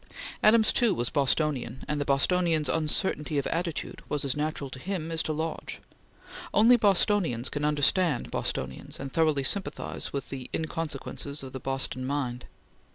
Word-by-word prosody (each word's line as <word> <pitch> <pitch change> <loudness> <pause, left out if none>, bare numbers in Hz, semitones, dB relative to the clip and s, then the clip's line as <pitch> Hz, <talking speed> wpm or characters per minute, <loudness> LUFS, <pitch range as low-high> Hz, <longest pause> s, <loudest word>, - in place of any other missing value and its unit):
Adams, 220 0 +5
too, 230 -6 +3
was 120 0 -2
Bostonian, 140 -2 0
and 150 -1 -1
the - - -1
Bostonian's 160 +3 +2
uncertainty 155 -1 0
of 140 - 0
attitude 170 -1 -3
was 145 -1 0
as 135 - +1
natural 150 -2 -2
to 130 - -8
him 165 0 -3
as 165 0 +2
to - - -1
Lodge. 160 +1 -4 0.8
Only 230 +4 +7
Bostonians 195 - +2
can 145 - -3
understand 150 +1 +2
Bostonians 65 0 -3
and 135 0 -5
thoroughly 155 -3 +2
sympathize 150 +1 -2
with 140 -2 -4
the 130 -2 -6
inconsequences 155 -3 -4
of 130 - -8
the 130 - -5
Boston 135 0 -1
mind. 130 -3 -2
150 Hz, 155 wpm, -28 LUFS, 135-165 Hz, 0.8 s, Only